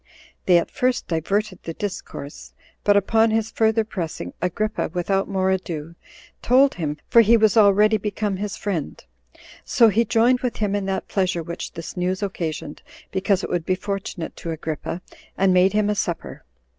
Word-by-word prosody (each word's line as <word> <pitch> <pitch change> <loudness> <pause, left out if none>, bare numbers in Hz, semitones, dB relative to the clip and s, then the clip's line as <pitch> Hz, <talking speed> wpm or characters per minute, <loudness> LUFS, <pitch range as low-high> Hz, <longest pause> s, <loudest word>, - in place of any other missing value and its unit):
They 180 -2 +6
at 170 - -1
first 255 -2 0
diverted 185 +4 -1
the 165 - -6
discourse; 180 -7 -7 0.3
but 205 0 +4
upon 225 +3 +3
his 220 0 0
further 220 0 +2
pressing, 165 - -5
Agrippa, 210 +5 -1
without 195 +3 0
more 190 -1 +1
ado, 170 -4 -3 0.5
told 270 +3 +4
him, 150 -4 -3
for 235 - +7
he 230 +1 +5
was 215 -3 +3
already 210 0 +5
become 205 -1 -2
his 205 0 -4
friend; 180 -8 -3 0.6
so 230 -2 +4
he 220 +3 +3
joined 235 +3 +3
with 250 -2 -2
him 205 -2 -1
in 200 -1 -1
that 190 0 -2
pleasure 185 -3 0
which 170 +2 -6
this 165 -1 -7
news 185 +2 -1
occasioned, 160 -6 -4 0.3
because 190 0 +1
it - - -4
would 175 -2 0
be 185 - 0
fortunate 195 -4 -5
to 170 - -6
Agrippa, 160 +2 -4 0.3
and 190 -1 +3
made 185 +2 +4
him 210 -1 +2
a 210 - +2
supper. 175 -4 -4
195 Hz, 170 wpm, -23 LUFS, 175-215 Hz, 0.6 s, for